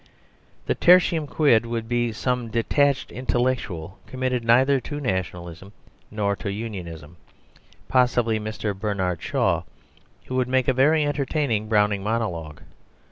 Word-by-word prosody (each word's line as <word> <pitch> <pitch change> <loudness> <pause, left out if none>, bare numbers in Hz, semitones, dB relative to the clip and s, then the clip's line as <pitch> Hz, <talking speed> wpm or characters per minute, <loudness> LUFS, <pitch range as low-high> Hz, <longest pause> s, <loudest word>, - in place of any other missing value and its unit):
The - - +1
"Tertium 170 -3 +4
Quid" 140 -7 +3
would 115 -1 -3
be 120 0 0
some 125 +2 -2
detached 135 +5 +1
intellectual, 120 -9 -2
committed 130 -2 -2
neither 130 +4 +4
to 145 +4 -6
Nationalism 95 - -4 0.4
nor 100 -1 -1
to 100 - -4
Unionism, 85 -7 -7 0.7
possibly 120 -3 +2
Mr. 105 -1 -4
Bernard 95 -4 -2
Shaw, - - 0 0.6
who 130 - -5
would 130 -1 +1
make 130 -1 +1
a 130 - +3
very 150 +4 +3
entertaining 140 -6 -1
Browning 105 -2 +2
monologue. 90 -9 -3
115 Hz, 125 wpm, -24 LUFS, 100-130 Hz, 0.7 s, Tertium